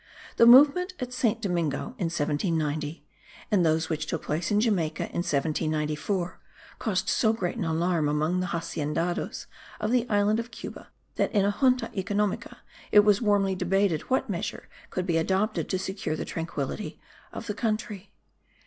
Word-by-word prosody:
The 235 - +7
movement 295 +9 +7
at 250 0 -4
Saint 230 -2 0
Domingo 175 - -1
in 180 - 0
1790 155 -1 -1 0.5
and 195 -4 +4
those 160 0 +2
which 155 -1 -2
took - - -3
place 160 +3 -2
in 210 - +3
Jamaica 185 -9 0
in - - -6
1794 155 +4 -1 0.4
caused 190 -5 -1
so 220 - +3
great 180 -4 -2
an 220 -7 -2
alarm 165 -1 +1
among 155 +4 +1
the 185 - -1
haciendados 165 0 -2 0.3
of 215 +1 -1
the 245 -1 +1
island 210 +1 +2
of 230 +1 -4
Cuba 235 - -9 0.3
that - - +1
in 200 -2 +3
a 200 - +3
Junta 255 +3 +2
economica 200 +1 -1 0.3
it 210 - +8
was 205 0 +3
warmly 200 -3 +2
debated 185 -2 +1
what 260 - +1
measure - - -4 0.2
could 185 - -2
be 170 -3 +1
adopted 190 +6 0
to 190 - 0
secure 190 -4 -3
the - - -4
tranquillity 165 +3 -4 0.3
of - - -7
the 210 - -3
country. 215 -3 -3
185 Hz, 160 wpm, -27 LUFS, 160-215 Hz, 0.5 s, it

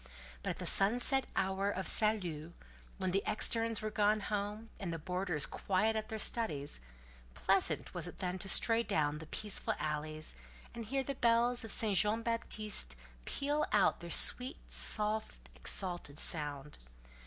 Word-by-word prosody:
But - - -4
at - - -5
sunset 245 +6 +3
or - - -22
the - - -24
hour 190 +1 -1
of 190 -1 -3
salut, 175 -8 +1 0.4
when 185 -1 -2
the 195 +2 +1
externes 225 0 0
were 215 - -3
gone 210 0 +2
home, 210 +2 -4
and 190 -5 -4
the 165 - -4
boarders 180 -2 -1
quiet 215 +3 -1
at 215 0 -4
their 220 - -4
studies; 150 - -2 0.6
pleasant 195 0 0
was 175 -2 -5
it - - -10
then 180 0 -4
to 195 - -3
stray 230 +3 +6
down 150 -9 -1
the 160 - -11
peaceful 210 +4 -2
alleys, 155 - -4 0.4
and 230 -1 -7
hear 270 +4 -2
the 275 - -4
bells 240 -1 +2
of 225 - -6
St. 215 -3 +2
Jean 215 +4 +1
Baptiste 215 - -2 0.3
peal 290 +2 -2
out 205 -2 +4
with - - -20
their 170 - -8
sweet, 250 +9 +2
soft, 210 - +3
exalted 175 - +2
sound. 150 -2 -1
200 Hz, 165 wpm, -33 LUFS, 170-225 Hz, 0.6 s, stray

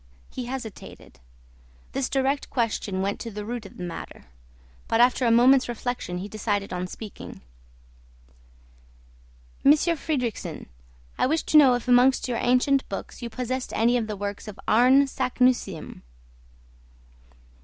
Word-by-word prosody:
He 250 - -5
hesitated. 240 - -8 0.7
This 270 -1 -2
direct 275 +1 0
question 215 -6 -1
went 200 +1 -2
to 230 - -6
the 210 -1 -7
root 235 -2 -5
of - - -17
the 180 - -6
matter. 175 -2 -8 0.6
But 225 - +1
after 245 +1 +4
a - - +4
moment's 255 +2 +5
reflection 240 -6 -4
he 185 +3 -5
decided 205 -2 -2
on 180 0 -3
speaking. 210 +2 -10 2.2
"Monsieur 305 +4 +4
Fridrikssen, 250 - -3 0.5
I - - +3
wished 315 +4 0
to 310 - +6
know 265 -4 +7
if 245 +1 -5
amongst 250 +2 +4
your 240 -2 -2
ancient 255 +2 +2
books 195 - -7
you 235 - -5
possessed 255 +2 -4
any 235 +2 +2
of 230 -3 0
the 210 -2 -5
works 205 +2 -5
of 210 -1 -9
Arne 255 +5 +5
Saknussemm?" 250 - -1
240 Hz, 140 wpm, -25 LUFS, 210-260 Hz, 2.2 s, know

